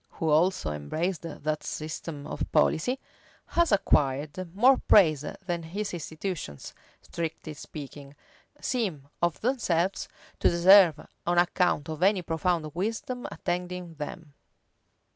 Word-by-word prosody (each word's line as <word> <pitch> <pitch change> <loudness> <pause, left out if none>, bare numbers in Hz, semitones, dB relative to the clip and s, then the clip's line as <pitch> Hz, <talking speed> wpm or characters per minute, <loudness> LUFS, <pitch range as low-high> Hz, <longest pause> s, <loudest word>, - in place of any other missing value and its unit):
who 160 - -2
also 160 - +2
embraced 155 - -2
that 155 -2 -3
system 155 -1 -6
of - - -4
policy, 245 +12 +2 0.5
has 340 -4 +2
acquired 150 -2 +1
more 255 +6 +6
praise 155 -8 +6 0.2
than 175 -2 -2
his 195 +6 -4
institutions, 160 - -5 0.3
strictly 160 -2 -5
speaking, 145 -1 -10 0.4
seem 190 - -2
of 170 -3 +1
themselves 195 -8 0 0.3
to - - +4
deserve 175 -2 +6 0.2
on 175 0 +2
account 175 -3 +2
of 155 0 -6
any 190 -1 +3
profound 165 -2 -1
wisdom 225 +6 -3
attending 180 -1 -4
them. 150 0 -8
170 Hz, 115 wpm, -28 LUFS, 155-185 Hz, 0.5 s, more